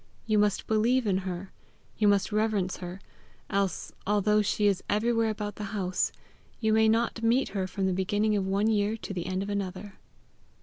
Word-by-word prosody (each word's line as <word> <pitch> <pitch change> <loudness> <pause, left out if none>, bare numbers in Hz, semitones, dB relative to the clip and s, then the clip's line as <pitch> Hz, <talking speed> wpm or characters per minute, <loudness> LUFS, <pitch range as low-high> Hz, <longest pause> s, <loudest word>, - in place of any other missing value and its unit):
You 215 -2 +2
must 205 -1 +1
believe 235 +4 +2
in 190 -2 +2
her; 180 +2 -6 0.4
you 210 - +2
must 200 0 +3
reverence 210 -3 0
her; 180 +2 -7 0.5
else, 195 -4 -1 0.2
although 210 +1 +3
she 210 0 0
is 195 -2 +3
everywhere 225 +1 +2
about 210 -1 -4
the 210 - -5
house, 185 -2 0 0.5
you 220 -2 +2
may 220 0 +5
not 230 +1 +1
meet 235 +4 +2
her 190 -2 -2
from 190 +1 -2
the 190 - +1
beginning 205 +3 +1
of 195 -2 0
one 200 +2 +1
year 215 0 +1
to 205 - -6
the 175 -2 -4
end 185 +1 -1
of 200 - -6
another. 195 0 -4
205 Hz, 185 wpm, -28 LUFS, 190-215 Hz, 0.5 s, may